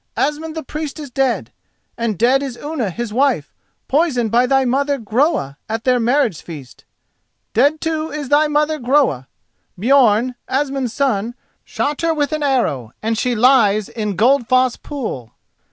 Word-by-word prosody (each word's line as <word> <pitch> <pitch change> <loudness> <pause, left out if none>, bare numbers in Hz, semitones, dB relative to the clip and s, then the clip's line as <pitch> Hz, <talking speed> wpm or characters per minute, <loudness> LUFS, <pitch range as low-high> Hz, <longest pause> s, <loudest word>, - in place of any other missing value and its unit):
Asmund 305 +3 -1
the 320 - -4
Priest 305 +1 -5
is 290 -4 -8
dead, 265 -2 -1 0.4
and 230 -4 -2
dead 255 +7 +3
is 265 -4 -5
Unna 290 -8 -3
his 225 +4 -5
wife, 255 - +1 0.3
poisoned 260 -7 +1
by 245 +2 +3
thy 270 0 +2
mother, 280 +3 +1
Groa, 230 - 0
at 225 +1 -3
their 250 -1 +2
marriage 240 - +1
feast. 145 -7 -11 0.7
Dead, 285 +7 +3
too, 320 0 -2
is 290 -3 -5
thy 300 +1 +4
mother, 300 +1 0
Groa. 245 - +1 0.5
Björn, 245 0 +3
Asmund's 270 -2 -1
son, 235 -3 -1 0.3
shot 290 +1 -3
her 330 -1 +1
with 290 -1 0
an 305 0 -2
arrow, 185 - 0
and 225 +1 0
she 245 +2 0
lies 215 -4 +4
in 210 -3 -3
Goldfoss 255 +2 +3
pool." 220 - -6
255 Hz, 155 wpm, -18 LUFS, 225-290 Hz, 0.7 s, thy